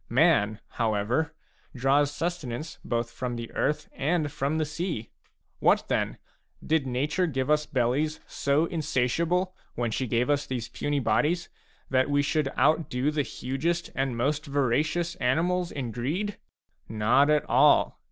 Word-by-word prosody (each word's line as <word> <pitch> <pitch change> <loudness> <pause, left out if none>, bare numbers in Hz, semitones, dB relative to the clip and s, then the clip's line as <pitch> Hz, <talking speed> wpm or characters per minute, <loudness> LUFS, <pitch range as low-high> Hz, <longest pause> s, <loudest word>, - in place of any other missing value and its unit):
Man, 120 -6 +3
how 110 -3 -1
ever, 120 +10 0 0.4
draws 135 +3 +3
sustenance 155 -2 -4
both 120 -1 -2
from 125 -1 -4
the 115 -1 -6
earth 150 - -1
and 150 +1 0
from 150 +1 -1
the 155 - +1
sea. 155 - -4 0.5
What, - - +3
then? - - 0 0.5
Did 155 -4 +1
nature 145 +8 0
give 135 -2 -1
us 150 0 +2
bellies 145 +3 0
so 140 +3 +1
insatiable, 165 +4 0 0.2
when 120 -1 -1
she 130 +3 -1
gave 120 +2 +1
us 145 0 +1
these 120 -3 -4
puny 145 +3 -1
bodies, 150 +8 +1 0.4
that 130 +1 +3
we 145 0 +2
should 150 0 +1
outdo 150 -3 +2
the 150 -1 0
hugest 145 +6 -2
and 135 -3 -1
most 145 +5 0
voracious 150 +5 +1
animals 170 +7 +1
in 125 -5 -4
greed? 160 - -2 0.5
Not 115 +7 +3
at 150 0 +2
all. - - +4
145 Hz, 145 wpm, -27 LUFS, 125-160 Hz, 0.5 s, all